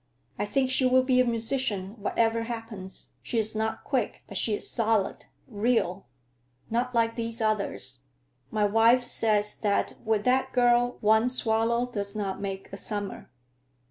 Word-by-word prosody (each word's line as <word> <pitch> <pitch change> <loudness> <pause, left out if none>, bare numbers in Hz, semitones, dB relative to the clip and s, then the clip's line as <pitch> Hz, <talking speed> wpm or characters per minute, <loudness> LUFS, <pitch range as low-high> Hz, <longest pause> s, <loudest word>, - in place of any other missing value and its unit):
I 205 - -1
think 260 +3 +1
she 260 - +3
will 255 0 +4
be 255 -1 +3
a 255 - +5
musician, 230 -4 0
whatever 225 +2 +1
happens. 225 -5 -7
She 235 - -3
is 220 -1 +1
not 220 0 -2
quick, 255 -6 -2
but 200 - -11
she 210 +2 +2
is - - -4
solid, 225 -3 0 0.2
real; 220 - 0 0.6
not 245 +2 -1
like 230 0 +2
these 230 0 -4
others. 205 - -1 0.5
My 210 +5 +1
wife 225 +4 +4
says 210 -3 +1
that 205 -2 0
with 220 -2 +1
that 260 +2 +1
girl 245 0 +3
one 220 +3 +4
swallow 235 -1 +1
does 205 -4 -5
not 200 -3 -3
make 195 -1 -6
a - - -5
summer." 205 -2 -5
225 Hz, 155 wpm, -27 LUFS, 205-245 Hz, 0.6 s, a